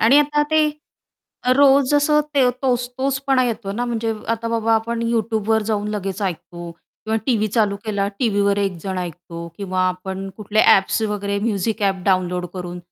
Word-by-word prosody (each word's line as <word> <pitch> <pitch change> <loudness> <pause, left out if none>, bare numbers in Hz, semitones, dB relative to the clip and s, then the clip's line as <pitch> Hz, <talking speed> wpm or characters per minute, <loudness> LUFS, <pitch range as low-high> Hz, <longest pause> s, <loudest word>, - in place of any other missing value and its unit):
आणि 250 +6 +6
आता 295 0 +2
ते 315 0 +4 1.0
रोज 280 0 +5
असं 300 +1 +4
ते 260 -3 +4
तोच 245 -2 +1
तोचपणा 270 -1 +1
येतो 220 -4 -3
ना? 240 +4 -2
म्हणजे 230 -2 -2
अ, - - -5 0.2
आता 230 0 -3
बाबा 230 0 +1
आपण 230 +1 -1
YouTubeवर 220 -1 0
जाऊन 210 -1 -1
लगेच 200 -1 -3
ऐकतो 175 -2 -5 0.3
किंवा 220 0 0
टीव्ही 215 -4 +2
चालू 210 -2 +1
केला 200 -2 -1
टीव्हीवर 200 -4 +2
एकजण 190 -1 -2
ऐकतो 170 -1 -7
किंवा, 185 -2 -2
आपण 190 +1 -5
कुठले 215 0 0
ॲप्स 195 +3 +4
वगैरे 205 -1 -1
म्युझिक 215 0 -1
ॲप 190 -2 0
डाउनलोड 180 -2 +1
करून 180 -1 -6
215 Hz, 165 wpm, -21 LUFS, 195-235 Hz, 1.0 s, आणि